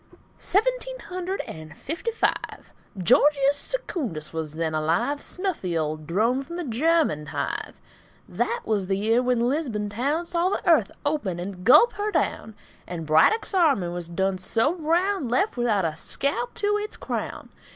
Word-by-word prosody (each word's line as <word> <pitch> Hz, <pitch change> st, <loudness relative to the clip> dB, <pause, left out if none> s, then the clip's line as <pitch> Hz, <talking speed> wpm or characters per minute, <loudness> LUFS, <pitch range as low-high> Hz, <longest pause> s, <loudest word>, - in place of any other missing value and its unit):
Seventeen -, -, 0 dB
hundred 370 Hz, -1 st, -4 dB
and 155 Hz, -1 st, -10 dB
fifty 330 Hz, -, -4 dB
five. 455 Hz, -, -2 dB, 0.2 s
Georgius 275 Hz, -, +4 dB
Secundus 260 Hz, -, -3 dB
was 160 Hz, -2 st, -4 dB
then 160 Hz, -1 st, -1 dB
alive, 165 Hz, -, 0 dB
Snuffy 345 Hz, -, -2 dB
old 155 Hz, -1 st, -3 dB
drone 225 Hz, +9 st, +1 dB
from 340 Hz, +5 st, -8 dB
the 350 Hz, -, -3 dB
German 275 Hz, -, +1 dB
hive. -, -, -4 dB, 0.5 s
That 475 Hz, +1 st, -1 dB
was 205 Hz, -4 st, 0 dB
the 195 Hz, 0 st, 0 dB
year 225 Hz, +4 st, +2 dB
when 250 Hz, -1 st, +1 dB
Lisbon 245 Hz, -8 st, -1 dB
town 280 Hz, +11 st, -1 dB
Saw 345 Hz, +1 st, +1 dB
the 390 Hz, -, -3 dB
earth 310 Hz, -, +5 dB, 0.2 s
open 255 Hz, -, -1 dB
and 180 Hz, 0 st, -6 dB
gulp 300 Hz, -, +7 dB
her 415 Hz, +1 st, -2 dB
down, 220 Hz, -, -1 dB, 0.3 s
And 170 Hz, -2 st, -5 dB
Braddock's 160 Hz, -, +3 dB
army 290 Hz, -, +3 dB
was 175 Hz, -1 st, -5 dB
done 190 Hz, +2 st, -1 dB
so 225 Hz, -, +2 dB
brown, 350 Hz, 0 st, 0 dB
Left 255 Hz, -, +1 dB
without 225 Hz, -7 st, +1 dB
a 155 Hz, -2 st, -1 dB
scalp 245 Hz, -, -2 dB
to 415 Hz, 0 st, +1 dB
its 420 Hz, 0 st, -5 dB
crown. -, -, -5 dB
250 Hz, 155 wpm, -25 LUFS, -, 0.5 s, gulp